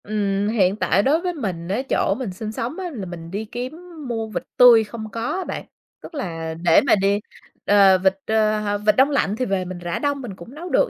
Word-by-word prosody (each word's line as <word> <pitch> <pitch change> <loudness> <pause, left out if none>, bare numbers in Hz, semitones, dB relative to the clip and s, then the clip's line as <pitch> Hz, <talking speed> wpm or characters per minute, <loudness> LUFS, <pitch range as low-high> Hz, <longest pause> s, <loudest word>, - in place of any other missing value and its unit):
Ừm, 205 -1 -1
hiện 200 -4 +2
tại 200 -2 +2
đối 305 +7 +2
với 360 0 -2
mình 185 - -4
á 200 +7 -1
chỗ 195 - +1
mình 250 -7 -4
sinh 215 +3 -5
sống 235 +7 -4
á 365 -2 -4
là 210 -7 -5
mình 170 -2 -8
đi 205 +3 -4
kiếm 245 +5 -5 0.3
mua 225 -2 -3
vịt 215 - -4
tươi 240 -3 +8
không 220 0 -8
có 230 - -5 0.2
á 380 - -2
bạn, - - -6 0.4
tức 335 - -11
là 165 - -4
để 170 -2 +6
mà - - +6
đi 200 0 +1 0.5
ờ, 200 -2 +6
vịt, 190 +1 +2
ơ, 215 -1 +2
h 205 -1 -2
vịt 210 -1 +4
đông 265 +4 +5
lạnh 245 -8 +1
thì 255 - -1
về 195 -4 -1
mình 180 0 -7
rã 175 -1 -3
đông 285 -1 -1
mình 225 -7 -7
cũng 210 +10 -12
nấu 345 +4 -7
được, - - +2
210 Hz, 240 wpm, -22 LUFS, 190-245 Hz, 0.5 s, tươi